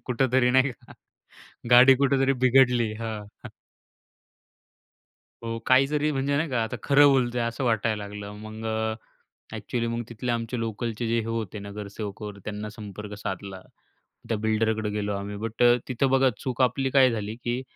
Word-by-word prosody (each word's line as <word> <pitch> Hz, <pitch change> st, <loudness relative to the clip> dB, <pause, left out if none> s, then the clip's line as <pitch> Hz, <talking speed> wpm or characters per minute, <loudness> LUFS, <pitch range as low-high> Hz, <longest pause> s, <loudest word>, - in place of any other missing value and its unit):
कुठेतरी 125 Hz, 0 st, +2 dB
नाही 130 Hz, +1 st, +3 dB
का 110 Hz, -, -18 dB, 0.8 s
गाडी 130 Hz, +2 st, +8 dB
कुठेतरी 135 Hz, 0 st, +2 dB
बिघडली. 125 Hz, -3 st, +4 dB
हां. 110 Hz, -2 st, -7 dB, 2.0 s
हो, 115 Hz, 0 st, -3 dB
काही 130 Hz, +1 st, +5 dB
जरी 150 Hz, +1 st, 0 dB
म्हणजे 140 Hz, +1 st, 0 dB
नाही 155 Hz, +2 st, 0 dB
का, 125 Hz, -3 st, 0 dB
आता 110 Hz, -, -5 dB
खरं 145 Hz, 0 st, +6 dB
बोलतो 125 Hz, -3 st, +2 dB
आहे 115 Hz, -, 0 dB
असं 115 Hz, +3 st, -4 dB
वाटायला 110 Hz, -3 st, 0 dB
लागलं. 105 Hz, 0 st, -8 dB
मग 110 Hz, +1 st, -8 dB
अ, 110 Hz, 0 st, -1 dB, 0.6 s
एक्चुअली 115 Hz, +3 st, -3 dB
मग 115 Hz, 0 st, -2 dB
तिथले 120 Hz, +1 st, -4 dB
आमचे 115 Hz, +1 st, -3 dB
लोकलचे 115 Hz, +1 st, -3 dB
जे 115 Hz, +1 st, +1 dB
हे -, -, -6 dB
होते 115 Hz, -2 st, -4 dB
नगरसेवकवर 100 Hz, 0 st, -7 dB
त्यांना 105 Hz, 0 st, -5 dB
संपर्क 105 Hz, -1 st, -9 dB
साधला. 95 Hz, -1 st, -6 dB, 0.7 s
त्या 115 Hz, -, 0 dB
बिल्डरकडे 110 Hz, 0 st, 0 dB
गेलो 105 Hz, 0 st, -2 dB
आम्ही. 100 Hz, +1 st, -5 dB
बट 115 Hz, +3 st, -3 dB
अ, 120 Hz, 0 st, +6 dB
तिथं 130 Hz, +1 st, 0 dB
बघा 135 Hz, 0 st, +4 dB
चूक 130 Hz, 0 st, -2 dB
आपली 130 Hz, +2 st, +1 dB
काय 130 Hz, -2 st, +5 dB
झाली, 110 Hz, -1 st, -4 dB
की 120 Hz, +2 st, -1 dB
115 Hz, 160 wpm, -26 LUFS, 105-130 Hz, 2.0 s, गाडी